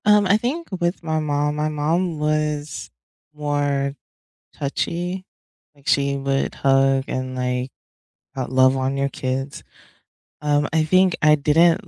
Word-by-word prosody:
Um, 210 -1 +5
I 200 +2 +4
think 280 +10 -3
with 175 0 -1
my 160 -1 0
mom 150 -1 0
my 150 0 0
mom 160 +3 0
was 150 0 -1 0.4
more 145 -2 -1 0.6
touchy, 175 +6 -3 0.5
like, 140 -1 -21
she 140 0 +2
would 135 0 -1
hug 135 0 +3
and, 130 0 -3
like, 125 0 -2 0.8
love 130 +1 +4
on 135 +1 -1
your 140 0 0
kids. 135 +1 -4 0.8
Um, 145 0 +2
I 160 -1 +3
think 185 +2 +3
I 150 0 +6
didn't 160 +3 +3
145 Hz, 130 wpm, -22 LUFS, 135-160 Hz, 0.8 s, I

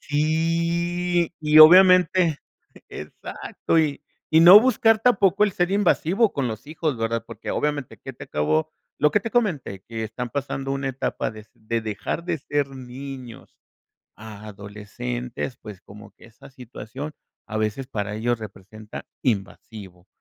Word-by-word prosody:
Sí, 170 +3 0
y 155 0 +4
obviamente 180 -1 +7 0.5
Exacto. 75 - -4
Y 150 -3 -1 0.3
y 160 - +6
no 180 +5 +10
buscar 225 -2 +3
tampoco 205 -4 +3
el 205 - -2
ser 175 +1 0
invasivo 200 +1 +2
con 135 -3 -1
los 110 +4 -7
hijos, 155 -3 -3
¿verdad?, 115 0 -2
Porque 115 -2 -7
obviamente 145 -3 -2
que - - -9
te - - -11
acabo 75 +1 0 0.3
lo 150 0 +3
que 210 - +3
te 230 - -5
comenté, 165 - -1
que 115 -1 -6
están 120 +3 -5
pasando 135 0 -4
una 135 0 -2
etapa 135 0 -3
de 110 -1 -12
de 115 +1 -3
dejar 110 +9 -4
de 170 -2 -1
ser 145 0 -2
niños 130 -1 -10 0.6
a 110 0 -10
adolescentes, 115 +5 -6
pues, 105 -4 -10
como 100 +1 -14
que - - -19
esa 115 +3 -16
situación 130 +2 -9 0.3
a 110 - -4
veces 110 +5 -2
para 105 -1 -4
ellos 120 +2 -1
representa, 105 +1 -10 0.2
invasivo, 100 -4 -4
135 Hz, 145 wpm, -23 LUFS, 110-165 Hz, 0.6 s, no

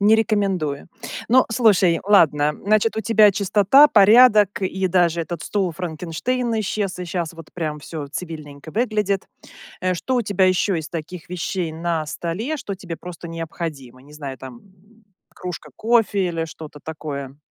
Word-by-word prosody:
Не 210 +2 +5
рекомендую. 195 -10 0 0.4
Ну, 255 +2 +5
слушай, 205 -7 +3
ладно. 150 -7 +4
Значит, 215 +2 +2
у - - 0
тебя 220 -2 +5
чистота, 205 +8 +5
порядок, 210 -2 +6
и 190 0 -1
даже 175 -2 +2
этот 170 +1 -6
стул-Франкенштейн 185 +6 -2
исчез, 200 -2 -2
и 180 - -4
щас 170 -1 -3
вот 165 -2 -13
прям 155 -3 -3
всё 150 -1 -6
цивильненько 155 -2 -8
выглядит. 210 -3 0 0.5
Э, 185 0 0
что 255 +9 -2
у 245 - +2
тебя 200 -3 +2
ещё 185 +1 +2
из 160 -1 -3
таких 170 +1 -7
вещей 180 -1 -3
на 165 -1 -2
столе, 195 - -3
что 200 -7 -5
тебе 180 -3 -7
просто 175 0 -9
необходимо? 160 -6 -6
Не 145 +2 -17
знаю, 140 -3 -7
там, 130 -2 -9
м, 205 +4 -25 0.3
кружка 170 -4 -7
кофе 220 -4 +2
или 165 -1 -2
что-то 150 -2 -11
такое? 140 -3 -6
180 Hz, 155 wpm, -21 LUFS, 160-210 Hz, 0.5 s, порядок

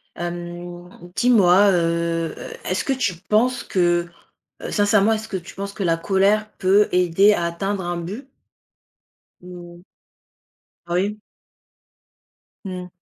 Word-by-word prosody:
Hem, 175 0 -7 0.3
dis-moi, 205 -5 +5
heu 170 -2 0
heu, - - -8
est-ce 185 - -1
que 275 - 0
tu 240 -8 -1 0.2
penses 245 +4 +2
que, 175 -2 +1 0.5
heu, - - -6
sincèrement, 205 0 +3
est-ce 220 0 -4
que 210 - -6
tu 180 -1 -7
penses 200 0 -6
que 200 - -4
la 165 -2 +1
colère 200 +4 +1
peut 200 +3 +4
aider 180 +3 +4
à 175 - -1
atteindre 190 +3 -3
un 175 0 -3
but? 205 +11 -7 1.1
Ou 175 0 -12 1.0
Oui. 195 +5 -1 1.4
Mmh. 180 -2 -7
185 Hz, 125 wpm, -21 LUFS, 175-205 Hz, 1.4 s, dis-moi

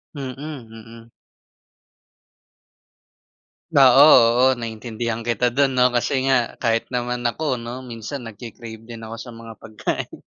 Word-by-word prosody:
Mm, 135 -2 -5
mm. 115 -5 -10 2.6
Oo, 135 +1 +7 0.4
oo. - - +6
Naiintindihan 115 0 -4
kita 120 +1 +1
dun 140 -1 +3
'no 125 0 +4
kasi 120 - 0
nga 135 -1 +4 0.3
kahit 115 -1 +1
naman 125 -1 -3
ako 155 +6 -5 0.2
'no, 125 +2 -7
minsan 120 +3 -7
nagki-crave 115 0 -10
din 115 -1 -8
ako 115 +1 -7
sa 120 - -10
mga 115 -1 -10
pagkain. 110 -1 -5
120 Hz, 120 wpm, -21 LUFS, 115-130 Hz, 2.6 s, Oo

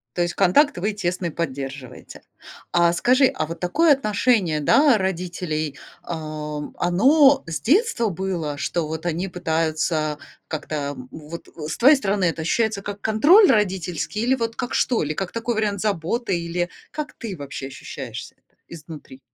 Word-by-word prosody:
То 175 - 0
есть 175 0 -1
контакт 275 +11 +4
вы 205 +4 -1
тесный 180 -3 -2
поддерживаете. 135 -4 -6 0.5
А 170 -1 +3
скажи, 255 +9 +4
а 155 -10 0
вот 165 - -7
такое 290 - +4
отношение, 210 - +1
да, 270 - +5
родителей, 175 -5 -3 0.3
а, 155 -2 -5 0.2
оно 270 - +4
с 165 - -3
детства 295 - +2
было, 170 -5 -3
что 160 +1 -2
вот 160 +2 -5
они 175 +3 -1
пытаются 160 -3 -1 0.3
как-то, 155 0 -5 0.2
м, 125 0 -10
вот, 160 +2 -9
э 155 -2 -8
С - - -4
твоей 275 +5 +7
стороны 200 -6 0
это 165 -1 -1
ощущается 220 +3 0
как 205 0 -6
контроль 315 - +6
родительский 190 -4 0
или 255 +3 +2
вот 230 -2 -3
как 245 0 -4
что, 245 - +2
или 150 +1 -2
как 190 +2 -4
такой 230 0 -2
вариант 205 -3 -1
заботы, 200 0 -1
или 175 +1 -2 0.2
как 305 -1 -5
ты 210 -5 -6
вообще 140 -2 -7
ощущаешься 130 - -8 0.3
изнутри? 150 -5 -11
180 Hz, 155 wpm, -22 LUFS, 160-220 Hz, 0.5 s, твоей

